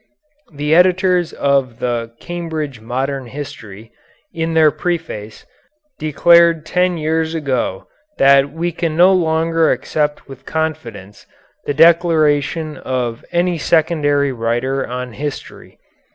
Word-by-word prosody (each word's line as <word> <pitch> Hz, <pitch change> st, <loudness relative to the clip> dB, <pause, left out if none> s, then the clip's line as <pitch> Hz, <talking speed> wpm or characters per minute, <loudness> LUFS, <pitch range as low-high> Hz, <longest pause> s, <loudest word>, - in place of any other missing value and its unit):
The 150 Hz, +1 st, -1 dB
editors 180 Hz, 0 st, +3 dB
of 135 Hz, -4 st, 0 dB
the 120 Hz, -2 st, -3 dB
"Cambridge 160 Hz, -7 st, -5 dB
Modern 130 Hz, +3 st, -3 dB
History," 115 Hz, -6 st, -9 dB, 0.4 s
in 165 Hz, 0 st, -2 dB
their 155 Hz, -2 st, +5 dB
preface, 155 Hz, -10 st, -5 dB, 0.5 s
declared 170 Hz, +1 st, +4 dB
ten 180 Hz, 0 st, 0 dB
years 160 Hz, +1 st, -1 dB
ago 130 Hz, -11 st, -2 dB, 0.3 s
that 140 Hz, 0 st, +4 dB
we 170 Hz, +2 st, -3 dB
can 165 Hz, -1 st, -3 dB
no 180 Hz, +2 st, +6 dB
longer 165 Hz, -2 st, +1 dB
accept 150 Hz, -1 st, -2 dB
with 135 Hz, -1 st, -12 dB
confidence 140 Hz, -11 st, -5 dB, 0.4 s
the 145 Hz, -, -2 dB
declaration 155 Hz, -2 st, +2 dB
of 125 Hz, -3 st, -3 dB
any 175 Hz, -1 st, 0 dB
secondary 145 Hz, -3 st, +1 dB
writer 120 Hz, +3 st, -2 dB
on 125 Hz, 0 st, -6 dB
history. 145 Hz, +2 st, -7 dB
150 Hz, 110 wpm, -17 LUFS, 130-165 Hz, 0.5 s, no